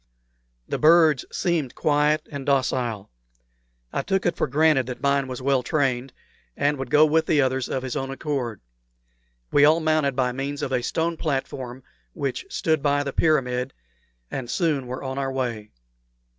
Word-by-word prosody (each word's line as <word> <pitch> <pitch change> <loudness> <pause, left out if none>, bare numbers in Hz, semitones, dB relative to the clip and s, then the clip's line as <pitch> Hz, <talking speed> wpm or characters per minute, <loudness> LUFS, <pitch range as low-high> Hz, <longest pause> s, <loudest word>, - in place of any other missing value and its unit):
The - - -3
birds 155 -3 +5
seemed 165 -8 -1
quiet 150 +1 +1
and 140 -2 -5
docile. 125 -6 0 0.8
I - - 0
took 195 +6 -1
it 175 - +1
for - - 0
granted 145 -2 +3
that 125 - -5
mine 140 -1 +2
was 130 0 -6
well 135 -1 +2
trained, 130 -1 0 0.5
and 145 -1 +1
would 135 -2 -4
go 150 +3 +6
with 160 +1 +2
the 150 - +3
others 130 -1 +1
of 130 - -2
his 130 +1 -4
own 135 -2 -2
accord. 135 -6 -3 0.9
We 145 - +5
all 155 +3 +6
mounted 155 -4 +1
by 125 -1 +1
means 140 +3 -4
of 135 - -2
a 125 -2 +1
stone 165 +6 -1
platform 135 -4 -3 0.3
which 140 - -3
stood 160 - 0
by 145 0 +2
the 140 - -4
pyramid, 130 -5 +1 0.6
and 125 -3 -4
soon 150 -5 0
were 130 +2 -5
on 130 0 -3
our 135 -1 -1
way. 120 -5 -3
140 Hz, 170 wpm, -24 LUFS, 130-155 Hz, 0.9 s, go